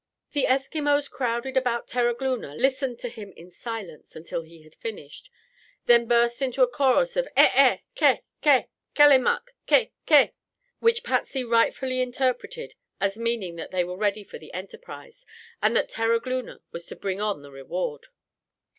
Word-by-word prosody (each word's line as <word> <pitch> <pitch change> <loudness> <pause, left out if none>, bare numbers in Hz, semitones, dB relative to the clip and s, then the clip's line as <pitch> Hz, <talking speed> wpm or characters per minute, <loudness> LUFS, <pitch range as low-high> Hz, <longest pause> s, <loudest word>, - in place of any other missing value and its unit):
The 285 -2 +1
Eskimos 285 +2 +1
crowded 245 +1 -2
about 245 -2 0
Terogloona, 240 - -1
listened 265 - 0
to - - -3
him 215 -4 -9
in 175 +2 -14
silence 200 -5 -8
until 165 +1 -5
he 165 -1 -16
had 155 - -18
finished, 465 +2 -9 0.6
then 235 -1 +5
burst 235 +1 +2
into 260 -1 +2
a - - +5
chorus 275 - +2
of - - 0
"Eh - - +7
eh! - - +5 0.2
Ke! - - +3 0.2
Ke 285 -4 +4 0.3
Kullemuk, 290 - +5 0.2
Ke 475 - +4 0.2
Ke," 295 -3 +6 0.5
which 460 0 +2
Patsy 270 - -1
rightfully 255 +2 +1
interpreted 255 - -2 0.3
as 195 +2 -1
meaning 230 -7 -2
that 165 - -7
they 185 -1 0
were 180 +1 -6
ready 205 +1 -1
for - - -11
the 155 - -13
enterprise 475 - -10 0.4
and - - +2
that - - +2
Terogloona 230 +3 -1
was 170 0 -7
to - - -8
bring 195 0 -3
on 205 -8 -2
the 140 - -13
reward. 460 - -5
245 Hz, 155 wpm, -25 LUFS, 205-275 Hz, 0.6 s, Eh